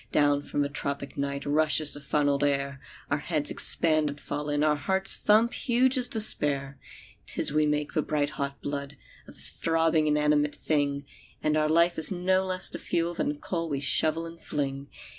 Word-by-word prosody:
"Down 145 Hz, -1 st, +2 dB
from 145 Hz, 0 st, -2 dB
the -, -, -1 dB
tropic 140 Hz, -1 st, -5 dB
night 140 Hz, 0 st, -4 dB
Rushes 155 Hz, 0 st, +2 dB
the 145 Hz, -, -4 dB
funnelled 145 Hz, 0 st, 0 dB
air; 140 Hz, -1 st, -1 dB, 0.3 s
Our 145 Hz, -, +1 dB
heads 150 Hz, -1 st, -2 dB
expand 155 Hz, -2 st, +3 dB
and 145 Hz, +1 st, -8 dB
fall 150 Hz, 0 st, -5 dB
in; 145 Hz, 0 st, 0 dB
Our 150 Hz, -1 st, +2 dB
hearts 190 Hz, +7 st, +2 dB
thump 220 Hz, +3 st, +2 dB
huge 255 Hz, +1 st, +2 dB
as 250 Hz, -2 st, +5 dB
despair. 140 Hz, -, +2 dB, 0.5 s
"'Tis -, -, 0 dB
we 155 Hz, 0 st, +2 dB
make 150 Hz, 0 st, -2 dB
the 155 Hz, -, +1 dB
bright 145 Hz, -1 st, -2 dB
hot 140 Hz, -1 st, -5 dB
blood 140 Hz, 0 st, -5 dB, 0.3 s
Of -, -, -13 dB
this -, -, +5 dB
throbbing 165 Hz, -1 st, 0 dB
inanimate 150 Hz, 0 st, +1 dB
thing; 140 Hz, -2 st, -2 dB, 0.4 s
And 155 Hz, 0 st, +1 dB
our 155 Hz, 0 st, +1 dB
life 170 Hz, +1 st, +2 dB
is 160 Hz, -, +4 dB
no 185 Hz, +1 st, +1 dB
less 185 Hz, -1 st, -1 dB
the -, -, -5 dB
fuel 170 Hz, +1 st, -2 dB
Than 225 Hz, -, -2 dB
the 295 Hz, -, -3 dB
coal 180 Hz, -, -4 dB
we 140 Hz, -2 st, -2 dB
shovel 155 Hz, +3 st, +1 dB
and 165 Hz, 0 st, -11 dB
fling. 140 Hz, -1 st, -4 dB
150 Hz, 190 wpm, -26 LUFS, 145-165 Hz, 0.5 s, as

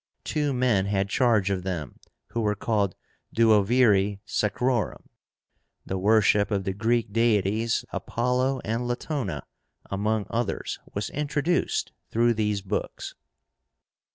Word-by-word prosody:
Two 150 Hz, -1 st, 0 dB
men 125 Hz, -7 st, +2 dB
had 100 Hz, -1 st, 0 dB
charge 110 Hz, -5 st, +2 dB
of 95 Hz, -2 st, -1 dB
them, 90 Hz, -8 st, -5 dB, 0.3 s
who 115 Hz, -, -2 dB
were 105 Hz, -1 st, +1 dB
called 100 Hz, -3 st, 0 dB, 0.4 s
duoviri 105 Hz, -2 st, +4 dB
sacrórum. 120 Hz, +2 st, 0 dB, 0.8 s
The 95 Hz, -, -3 dB
worship 105 Hz, 0 st, +4 dB
of 100 Hz, -3 st, 0 dB
the 95 Hz, -, -2 dB
Greek 115 Hz, +1 st, 0 dB
deities, 110 Hz, -1 st, +2 dB
Apollo 125 Hz, +3 st, 0 dB
and 115 Hz, +3 st, -2 dB
Latóna, 120 Hz, -, -3 dB, 0.5 s
among 105 Hz, +1 st, 0 dB
others, 115 Hz, -2 st, -2 dB, 0.2 s
was 100 Hz, -2 st, -2 dB
introduced 150 Hz, +3 st, 0 dB, 0.2 s
through 120 Hz, +1 st, +3 dB
these 105 Hz, -3 st, -1 dB
books. 95 Hz, -, -4 dB
110 Hz, 115 wpm, -26 LUFS, 100-120 Hz, 0.8 s, duoviri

